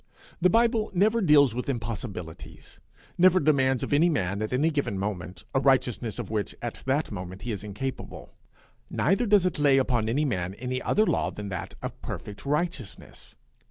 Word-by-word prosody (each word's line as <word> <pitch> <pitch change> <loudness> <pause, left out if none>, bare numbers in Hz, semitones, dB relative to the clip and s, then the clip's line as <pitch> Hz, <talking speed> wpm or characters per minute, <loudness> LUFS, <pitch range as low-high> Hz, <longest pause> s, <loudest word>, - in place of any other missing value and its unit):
The 180 - +5
Bible 230 +1 +2
never 215 +5 +3
deals 145 - +5
with 125 +3 -4
impossibilities, 110 -9 -6 0.4
never 185 +1 +6
demands 135 -4 +2
of - - -2
any 160 +5 +4
man 100 - -1
at 110 - -2
any 145 +6 +2
given 140 -9 -1
moment 95 -2 -5
a 135 - +3
righteousness 125 -4 +1
of 115 -4 -5
which 105 -2 -2
at 120 -1 -6
that 140 +2 0
moment 95 0 -7
he 120 - -3
is 105 -1 -5
incapable; 105 +6 -6 0.6
neither 225 +6 +1
does 205 -3 +4
it 180 -3 -1
lay 140 -2 +5
upon 120 -4 +1
any 145 +6 +1
man 95 -7 -2
any 125 +3 -3
other 215 - +2
law - - +1
than 105 -1 -7
that 95 - -5
of - - -6
perfect 105 +6 -7
righteousness. 150 - -4
130 Hz, 175 wpm, -27 LUFS, 105-155 Hz, 0.6 s, never